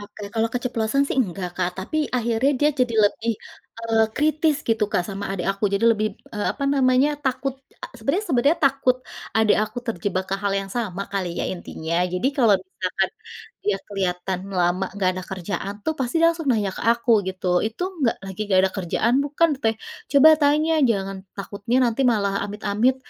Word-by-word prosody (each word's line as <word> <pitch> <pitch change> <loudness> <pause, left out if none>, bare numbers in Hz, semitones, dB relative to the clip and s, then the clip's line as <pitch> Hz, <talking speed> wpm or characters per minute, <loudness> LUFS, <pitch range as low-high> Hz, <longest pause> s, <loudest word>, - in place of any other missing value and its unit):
Oke 205 0 -11
kalau 225 0 +1
keceplosan 245 +1 0
sih - - -2
enggak 190 -6 -1
Kak 180 -1 0
tapi 190 +11 -4 0.2
akhirnya 235 +2 +1
dia 295 +1 +4
jadi 245 -2 +1
lebih, 225 +3 +1 0.5
eee, 225 -1 +2
kritis 305 0 +2
gitu 225 -2 +2
Kak - - +2
sama 200 0 -5
adik 190 -2 -3
aku 195 +2 -4
jadi 200 - +1
lebih, 215 -1 0
b - - -30
eee, 210 - -2
apa 280 - -4
namanya 255 +1 +4 0.2
takut 265 +1 -1 0.3
a - - -5
sebenarnya 310 - 0
sebenarnya 280 +5 +3
takut 270 -2 +3 0.4
adik 220 -1 +4
aku 215 +3 -7
terjebak 190 -3 -2
ke - - +1
hal 200 -1 +1
yang 195 0 -8
sama 200 -5 -2
kali 190 -3 -1
ya - - -1
intinya 170 -2 -5 0.2
jadi 180 +8 0
kalau 230 -6 +5
misalkan, 185 0 -2 0.6
dia 420 +1 +1
kelihatan 185 -2 -2 0.2
lama 180 +2 +2
enggak 195 -2 +1
ada 185 - -5
kerjaan 195 +2 -4
tuh 315 - +1
pasti 245 +1 -2
dia 330 - +6
langsung 325 -5 -3
nanya 210 -4 0
ke - - -5
aku 235 0 0 0.2
gitu, 185 0 -4 0.2
"Itu 225 +10 -5
enggak 270 -9 +1
lagi 190 0 -8
enggak 190 -2 +3
ada - - -10
kerjaan 195 +6 0
bukan, 300 +3 +2
Teh? 225 0 +2 0.4
Coba 285 +2 +8
tanya 300 +2 +3 0.2
jangan 195 -3 -1 0.2
takutnya 200 +4 -2
nanti 230 +3 -1
malah 200 -3 0
amit-amit, 210 +4 0
220 Hz, 185 wpm, -23 LUFS, 195-255 Hz, 0.6 s, Coba